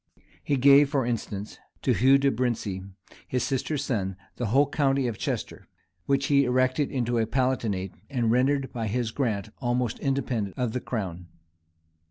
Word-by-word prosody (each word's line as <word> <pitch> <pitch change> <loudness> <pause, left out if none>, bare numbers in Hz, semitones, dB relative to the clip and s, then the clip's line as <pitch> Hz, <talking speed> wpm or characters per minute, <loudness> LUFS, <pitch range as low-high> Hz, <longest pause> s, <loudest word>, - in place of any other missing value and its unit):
He 140 - +1
gave, 140 +2 +6
for 140 -4 0
instance, 105 -3 -4 0.2
to - - +3
Hugh 135 +3 +5
de 140 0 +2
Abrincis, 110 -6 -2 0.4
his 125 - -1
sister's 140 +2 -1
son, 100 -8 -2 0.2
the 120 - -1
whole 135 +7 +4
county 140 -2 +1
of 115 -4 -3
Chester, - - -4 0.4
which 140 0 +2
he 140 -1 +4
erected 130 +2 +1
into 120 -2 0
a 110 - +1
palatinate, 115 -7 -1 0.2
and 120 -5 +1
rendered 135 +2 +1
by 115 -2 -2
his 115 +1 -1
grant 110 -6 -1
almost 120 -2 -1
independent 125 -7 -2
of 125 -3 0
the 125 - -2
crown. 90 -7 -4
125 Hz, 160 wpm, -26 LUFS, 110-135 Hz, 0.4 s, gave